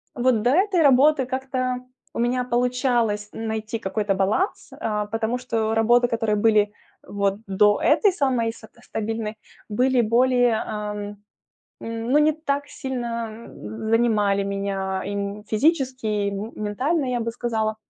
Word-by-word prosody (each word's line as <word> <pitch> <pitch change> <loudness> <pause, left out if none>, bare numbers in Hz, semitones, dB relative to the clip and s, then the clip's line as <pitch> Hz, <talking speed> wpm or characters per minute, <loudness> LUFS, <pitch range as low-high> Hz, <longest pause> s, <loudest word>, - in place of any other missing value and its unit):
вот 245 -2 +2
до 245 - +2
этой 370 +1 +3
работы 280 0 +5
как-то 255 -1 -2 0.4
у - - -5
меня 250 +1 +1
получалось 240 -4 0
найти 220 0 -4
какой-то 195 0 -1
баланс, 205 - 0
а, 210 -1 -1
потому 225 +3 -2
что 225 -3 -1
работы, 240 +2 +4
которые 225 -2 0
были 210 -1 +3 0.3
вот 200 -1 0
до 205 +2 +3
этой 410 -3 +4
самой 255 -8 0
са 220 - -14
стабильной, 220 0 -4 0.3
были 250 +3 +2
более, 245 +1 +3
ам, 210 -1 -5 0.6
ну, 230 +5 0
не 305 +1 +4
так 285 -2 -2
сильно 235 -3 -5 0.4
занимали 210 -4 +2
меня 195 -1 -2
и 200 +1 -4
физически, 260 0 +1
и 205 -1 0
ментально, 220 +9 -2
я 245 -1 -1
бы 230 0 -2
сказала. 220 -2 -2
225 Hz, 130 wpm, -23 LUFS, 210-255 Hz, 0.6 s, работы